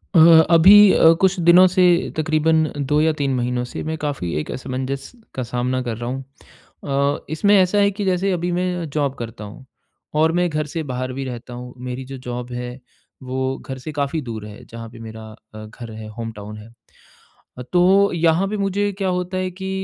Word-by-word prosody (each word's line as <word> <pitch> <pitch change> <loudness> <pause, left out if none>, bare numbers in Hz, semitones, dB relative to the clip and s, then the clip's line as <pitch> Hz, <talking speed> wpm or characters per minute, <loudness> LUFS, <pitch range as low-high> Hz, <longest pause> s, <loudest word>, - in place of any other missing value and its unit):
अ, - - +7 0.3
अभी 195 +4 +8
अ, 160 - +6
कुछ 190 -1 +2
दिनों 180 +2 +8
से 185 0 +2 0.3
तकरीबन 155 +1 +2 0.3
2 150 0 +3
या 160 +1 +3
3 140 -3 -1
महीनों 125 0 -1
से - - -5
मैं 160 +1 -3
काफ़ी 145 - -3
एक 75 - -5
असमंजस 130 +1 -5 0.2
का 130 - -2
सामना 125 +2 -2
कर 115 -2 -3
रहा 120 +1 -4
हूँ। 135 +1 -4 0.6
अ, 140 0 -1
इसमें 160 +7 +2
ऐसा 185 +1 +3
है 200 0 +4
कि 205 - -2
जैसे 190 +1 +1
अभी 175 0 -1
मैं 180 -1 -2
जॉब 140 -3 -1
करता 115 -2 -7
हूँ 105 +6 -11 0.6
और 160 +1 +4
मैं 180 0 +1
घर 155 -1 -2
से 165 - -1
बाहर 130 +1 -3
भी 135 +1 -4
रहता 125 -1 -7
हूँ 125 0 -8
मेरी 125 +1 -5
जो 135 - -6
जॉब 125 0 -5
है 125 0 -4 0.5
वो 130 +1 -2
घर 130 - -8
से 145 +4 -7
काफ़ी 145 +2 -2
दूर 115 -5 -7
है 105 0 -12
जहाँ 115 0 -9
पे 115 0 -14
मेरा 110 -1 -9 0.3
अ, 110 0 -8
घर 115 +2 -10
है 110 0 -8
होमटाउन 105 -2 -7
है। 105 +1 -12 0.9
अ, - - -6
तो 190 +3 +4
यहाँ 170 +2 +2
पे 210 - -3
मुझे 200 +1 0
क्या 195 -2 -1
होता 180 +1 -2
है 185 0 -2
कि 190 - -3
140 Hz, 205 wpm, -21 LUFS, 125-180 Hz, 0.9 s, अभी